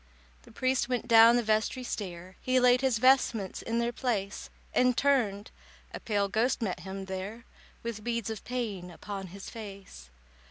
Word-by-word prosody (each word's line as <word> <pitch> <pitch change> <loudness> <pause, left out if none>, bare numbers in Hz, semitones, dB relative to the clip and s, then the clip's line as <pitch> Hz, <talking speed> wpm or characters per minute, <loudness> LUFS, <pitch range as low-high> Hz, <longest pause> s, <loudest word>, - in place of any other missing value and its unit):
The - - -17
priest 255 -1 0
went 250 -3 -1
down 230 0 +8
the 240 - +2
vestry 220 +4 0
stair, 185 -5 -6
He 255 0 +2
laid 250 0 +5
his 260 -3 +2
vestments 240 -5 +3
in 230 0 -2
their 235 0 +1
place, 215 -6 -3 0.2
And 250 -1 +3
turned—a 225 -8 -1
pale 205 -2 0
ghost 225 +6 +1
met 190 -6 -2
him 190 +2 -6
there, 195 +5 -6 0.4
With 230 -2 -5
beads 235 -2 -2
of 220 - -6
pain 215 -8 -4
upon 195 +2 -7
his 195 +2 -9
face. 200 - -10
225 Hz, 160 wpm, -29 LUFS, 195-245 Hz, 0.4 s, down